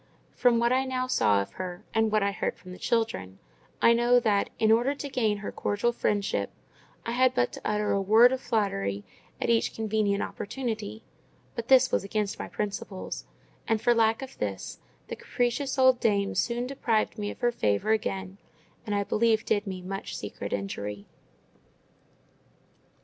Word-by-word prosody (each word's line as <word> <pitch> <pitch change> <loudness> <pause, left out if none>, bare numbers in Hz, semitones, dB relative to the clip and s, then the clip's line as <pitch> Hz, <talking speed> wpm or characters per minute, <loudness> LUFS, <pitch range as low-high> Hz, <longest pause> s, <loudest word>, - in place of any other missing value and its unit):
From 245 -2 +3
what 235 +1 +3
I 260 +1 +3
now 255 -1 -1
saw 105 - +3
of - - -14
her, 180 +1 -6
and 225 -1 +2
what 215 -1 +3
I 200 - +1
heard 200 - -3
from 185 - -12
the 180 - -10
children, 225 - -1 0.5
I 230 - +7
know 240 +1 +4
that, 210 -4 +1
in 220 0 +3
order 240 +5 +3
to 285 0 -6
gain 220 -6 +1
her - - -3
cordial 205 +4 0
friendship, 205 -3 -1 0.6
I 230 - -2
had 255 +1 +3
but 120 - +2
to - - -8
utter 210 0 0
a 200 - +2
word 220 +5 +6
of 260 0 -2
flattery 100 - -1 0.4
at - - +1
each 230 - +1
convenient 215 -2 0
opportunity: 220 -2 -5 0.5
but 235 -1 -5
this 260 -1 +6
was - - +1
against 205 0 -2
my - - -4
principles; 200 -2 -5 0.4
and 225 -1 +2
for 240 - +3
lack 225 +2 +2
of 265 - -10
this, 100 -2 -4 0.3
the - - -5
capricious 255 +3 -1
old 260 -1 +5
dame 200 -2 +1
soon 240 +1 0
deprived 235 -4 -1
me 205 0 -2
of - - -9
her 240 - +3
favour 105 - 0
again, 195 -3 -2 0.5
and 210 - 0
I 200 - +1
believe 220 +1 +2
did 205 0 0
me 185 -1 -5
much 195 +1 -5
secret 100 0 -6
injury. 100 +1 -4
215 Hz, 175 wpm, -28 LUFS, 195-240 Hz, 0.6 s, I